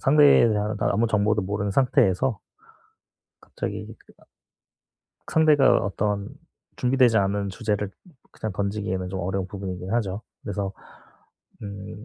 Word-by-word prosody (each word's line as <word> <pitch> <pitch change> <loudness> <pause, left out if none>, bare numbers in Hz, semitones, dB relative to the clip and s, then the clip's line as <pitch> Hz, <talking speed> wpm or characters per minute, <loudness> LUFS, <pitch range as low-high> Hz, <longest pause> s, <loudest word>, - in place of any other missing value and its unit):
상대에 145 -4 +6
대한 105 0 -1
아무 110 +3 +2
정보도 105 -1 +1
모르는 100 +1 -2
상태에서 110 -1 +2 1.0
갑자기 - - -5
그 - - -22
아 - - -24 1.1
상대가 155 -4 +5
어떤 100 +1 -2 0.5
준비되지 125 -3 +3
않은 100 0 0
주제를 105 -1 -2 0.4
그냥 110 -3 -5
던지기에는 100 -2 -2
좀 95 - -4
어려운 95 +1 -2
부분이긴 95 -1 -6
하죠. 105 -3 -1 0.2
그래서 100 -2 -3 0.9
음 100 +1 -8
105 Hz, 285 characters per minute, -24 LUFS, 95-110 Hz, 1.1 s, 상대에